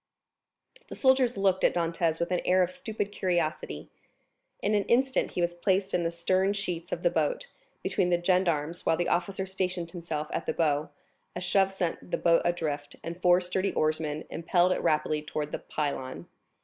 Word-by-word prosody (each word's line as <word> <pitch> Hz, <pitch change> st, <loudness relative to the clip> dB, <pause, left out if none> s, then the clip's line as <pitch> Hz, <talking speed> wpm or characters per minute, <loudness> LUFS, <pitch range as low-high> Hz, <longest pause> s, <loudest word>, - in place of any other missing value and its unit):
The -, -, -8 dB
soldiers 260 Hz, -3 st, +3 dB
looked 190 Hz, -1 st, +2 dB
at -, -, +4 dB
Dantès 165 Hz, -1 st, 0 dB
with 170 Hz, -, -1 dB
an 180 Hz, -, +1 dB
air 185 Hz, 0 st, +4 dB
of 180 Hz, -, -2 dB
stupid 205 Hz, +1 st, -4 dB
curiosity. 165 Hz, -, -2 dB, 0.7 s
In 210 Hz, -, 0 dB
an 205 Hz, -1 st, +2 dB
instant 260 Hz, +2 st, +2 dB
he 180 Hz, -, -1 dB
was 175 Hz, 0 st, +1 dB
placed 190 Hz, +2 st, 0 dB
in 175 Hz, -, +2 dB
the 165 Hz, -, 0 dB
stern 185 Hz, +3 st, +1 dB
sheets 175 Hz, -3 st, -4 dB
of -, -, -3 dB
the -, -, +3 dB
boat, -, -, 0 dB, 0.4 s
between 185 Hz, -3 st, +1 dB
the 175 Hz, -1 st, +3 dB
gendarmes, 175 Hz, -3 st, +1 dB
while 165 Hz, -, +2 dB
the 175 Hz, -, 0 dB
officer 190 Hz, +2 st, 0 dB
stationed 185 Hz, -3 st, -2 dB
himself 165 Hz, -3 st, -4 dB
at 165 Hz, -, -3 dB
the -, -, +1 dB
bow; 150 Hz, -2 st, +1 dB, 0.5 s
a -, -, -2 dB
shove 190 Hz, +2 st, +2 dB
sent 180 Hz, -3 st, -3 dB
the -, -, 0 dB
boat 170 Hz, -1 st, +4 dB
adrift, 155 Hz, -4 st, -2 dB
and 170 Hz, +2 st, -6 dB
four 175 Hz, 0 st, +5 dB
sturdy 185 Hz, +2 st, -1 dB
oarsmen 155 Hz, 0 st, -1 dB
impelled 175 Hz, +2 st, +2 dB
it -, -, 0 dB
rapidly 155 Hz, 0 st, +1 dB
towards 150 Hz, 0 st, -4 dB
the -, -, -3 dB
Pilon. 130 Hz, -, -4 dB
175 Hz, 185 wpm, -28 LUFS, 160-190 Hz, 0.7 s, four